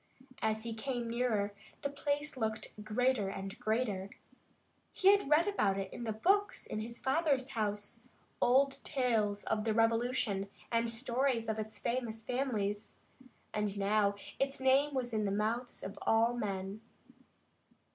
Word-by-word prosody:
As 220 0 0
he 230 -1 -3
came 240 +1 -3
nearer, 220 -4 +1 0.3
the 280 - 0
place 285 +1 -1
looked 220 -3 -3
greater 215 -1 +1
and 195 +2 -6
greater. 215 -4 0 0.8
He 380 - +5
had 400 -7 +4
read 305 +3 +5
much 410 - 0
about 195 - +2
it 195 -1 -4
in 240 - -5
the 220 - -1
books 390 - +2
in 215 - -4
his 235 +2 -5
father's 270 -2 +1
house 210 -2 -1 0.4
old 270 +2 +4
tales 225 -7 +1
of 215 -1 0
the 220 -1 0
Revolution 225 -3 +1 0.2
and 230 0 +2
stories 240 0 +1
of 220 0 -1
its 215 0 -4
famous 235 -2 -2
families 220 -6 -1 0.6
and 210 -1 -1
now 200 0 +2 0.2
its 275 0 0
name 270 +2 +3
was 245 -2 -1
in 215 -1 +1
the 200 - 0
mouths 225 +4 -1
of 195 - -6
all 225 +2 +3
men. 200 -2 -3
230 Hz, 150 wpm, -34 LUFS, 210-260 Hz, 0.8 s, He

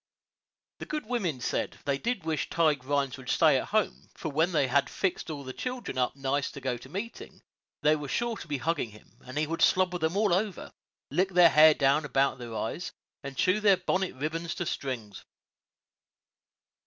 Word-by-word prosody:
The - - -7
good 305 -4 -3
women 200 - -1
said, - - -2
they 140 -1 0
did 235 - -2
wish 160 -1 -2
Tige 155 -5 +2
Rhines 140 -1 0
would 130 -2 -9
stay 150 -5 +4
at - - -5
home, 215 -1 -1
for 160 - -4
when 160 +5 +2
they 150 -5 +3
had 140 +2 +2
fixed 190 -2 -2
the 140 -4 -6
children 250 - -4
all 125 - +5
up - - -19
nice 135 0 -1
to - - -7
go 130 -2 -2
to 120 - -12
meeting, 210 +5 -7 0.4
they 155 0 +5
were 150 -2 -5
sure 235 - -1
to - - -9
be 145 -2 -1
hugging 160 -3 -1
him, 105 0 -18
and 130 +3 -7
he 155 - +2
would 165 +2 -4
slobber 185 -1 +3
them 160 +4 0
all 205 -3 +3
over, 195 +1 -1 0.4
lick 185 +1 +2
their 175 -2 +7
hair 155 0 +7
down 140 +2 +3
about 135 -1 +1
their 120 -2 -7
eyes, 170 +11 -3 0.3
and 140 -1 -7
chew 185 +8 +3
their 205 -3 +5
bonnet 185 -1 -1
"ribbins" 160 +4 -3
into 175 - -3
strings. 120 -10 -4
155 Hz, 195 wpm, -29 LUFS, 135-185 Hz, 0.4 s, their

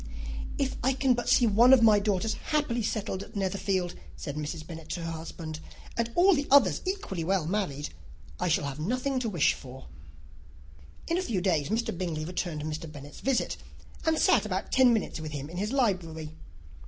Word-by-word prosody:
"If 270 -1 -1
I 265 +2 +3
can 265 -1 +3
but 240 0 -2
see 245 - +5
one 235 +4 +6
of 250 -3 +6
my 215 -2 +7
daughters 205 +1 0
happily 295 -6 -1
settled 210 -3 -2
at 215 - -11
Netherfield," 190 -2 -1 0.2
said 145 -3 -6
Mrs. 155 +1 -4
Bennet 165 -1 -9
to 175 - -3
her 165 - -3
husband, 160 -1 -6 0.4
"and 235 0 0
all 375 +3 +6
the 285 -3 0
others 240 - +5
equally 370 - -2
well 185 -1 +1
married, 160 -6 -2 0.5
I - - 0
shall 165 -3 +2
have 140 +1 -5
nothing 255 - 0
to 235 -3 -1
wish 170 -8 +3
for." 130 -1 -11 1.2
In 335 +2 +1
a - - 0
few 225 - -1
days 175 -6 +1
Mr. 225 -2 -1
Bingley 165 -4 -3
returned 175 -3 -3
Mr. 155 +1 -5
Bennet's 145 -1 -10
visit, 270 -1 0 0.5
and 320 -1 +2
sat - - +4
about - - -3
ten 260 -2 +6
minutes 220 -7 0
with 155 -1 -6
him 145 +1 -5
in 175 - -7
his 210 +4 -1
library. 175 - 0
190 Hz, 190 wpm, -28 LUFS, 160-240 Hz, 1.2 s, my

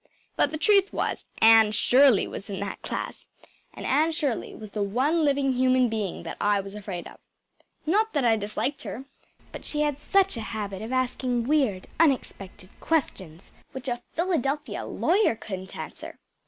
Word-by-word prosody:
But - - +2
the 310 - -4
truth 400 +3 +4
was, - - -2 0.2
Anne 225 -1 +7
Shirley 255 +1 +5
was 200 - -8
in 195 - -4
that 200 -1 -5
class; - - -5 0.4
and - - -9
Anne 305 +5 +2
Shirley 295 -7 -2
was 215 -2 -10
the 210 - -3
one 265 +11 +1
living 280 -2 +2
human 255 -1 +3
being 215 -4 -3
that - - -6
I 205 -1 +3
was 195 0 -7
afraid 195 -4 -6
of. - - -14 0.7
Not 425 +7 +2
that 285 -5 +1
I 225 -1 +5
disliked 215 +7 -3
her. 260 +4 -7 0.5
But - - -9
she 300 - -2
had 295 -2 0
such 390 -1 +2
a - - -3
habit 210 -3 -5
of 220 +3 -6
asking 255 -1 0
weird, 265 -11 +1
unexpected 200 - 0
questions, 190 - -2 0.2
which 265 0 -7
a 240 -1 -2
Philadelphia 305 -4 -1
lawyer 380 - +2
couldn’t 190 -3 -7
answer. - - -8
250 Hz, 170 wpm, -26 LUFS, 210-295 Hz, 0.7 s, Anne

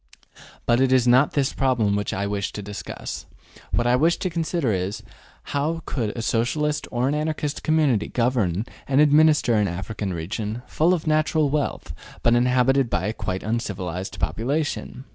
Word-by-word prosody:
But 120 +2 +3
it 135 -1 +3
is 130 -2 +4
not 130 +4 +5
this 140 -2 +1
problem 125 -7 +1
which 105 -1 -2
I 100 +1 -2
wish 100 -1 -2
to 105 - -6
discuss. 105 0 -7 0.4
What 120 - 0
I 120 +1 +4
wish 160 +6 +3
to 185 - -2
consider 165 -5 -1
is, 95 +3 -3 0.5
how 155 +3 -1
could 115 -6 -2
a 115 - -3
Socialist 150 +7 0
or 125 +1 0
an 140 - +1
Anarchist 150 -1 -2
community 150 -9 +2
govern 115 -6 0 0.2
and 135 0 +2
administer 150 -3 +5
an 105 -2 +3
African 95 +3 -4
region, 105 +7 -4
full 170 +4 +2
of 165 - -6
natural 155 -1 +2
wealth, 140 - -2 0.3
but 120 - +4
inhabited 125 +1 +3
by 90 - 0
a 105 - -1
quite 95 -4 -4
uncivilized 95 -6 -3
population? 125 - -2
125 Hz, 165 wpm, -23 LUFS, 105-150 Hz, 0.5 s, not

